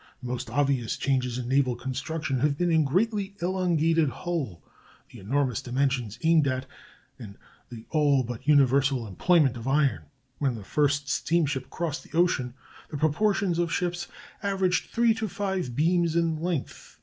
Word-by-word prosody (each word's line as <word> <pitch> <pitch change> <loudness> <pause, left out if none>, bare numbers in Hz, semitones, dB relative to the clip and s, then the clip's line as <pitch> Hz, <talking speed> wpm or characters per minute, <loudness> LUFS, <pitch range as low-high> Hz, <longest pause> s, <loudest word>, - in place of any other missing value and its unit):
The 125 - -5
most 125 -1 -4
obvious 135 -2 0
changes 125 -3 0
in 125 -1 -4
naval 130 -1 +2
construction 130 +3 -3
have 140 +1 +1
been 175 +1 +1
in 160 -1 +4
the - - -3
greatly 200 +3 0
elongated 165 -4 +1
hull, 135 - -4 0.5
the - - -12
enormous 125 +3 0
dimensions 125 -3 -1
aimed 160 -3 +4
at, 130 0 -1 0.5
and 105 -5 -10 0.3
the 115 -2 -10
all 145 -4 +3
but 120 +2 -7
universal 135 -3 +3
employment 135 - +2
of 115 +2 -7
iron. 135 - +1 0.3
When 135 -4 0
the 110 - -8
first 145 +4 0
steamship 145 -3 0
crossed 165 -2 -3
the 160 - -7
ocean 130 -8 +1 0.3
the 150 - -5
proportions 175 +4 +1
of 170 -1 0
ships 175 0 -2 0.3
averaged 190 -2 0
three 235 -1 +3
to 220 0 -3
five 190 - -3
beams 170 +2 +2
in 165 -2 +1
length.... 170 -5 -4
145 Hz, 160 wpm, -27 LUFS, 130-170 Hz, 0.5 s, in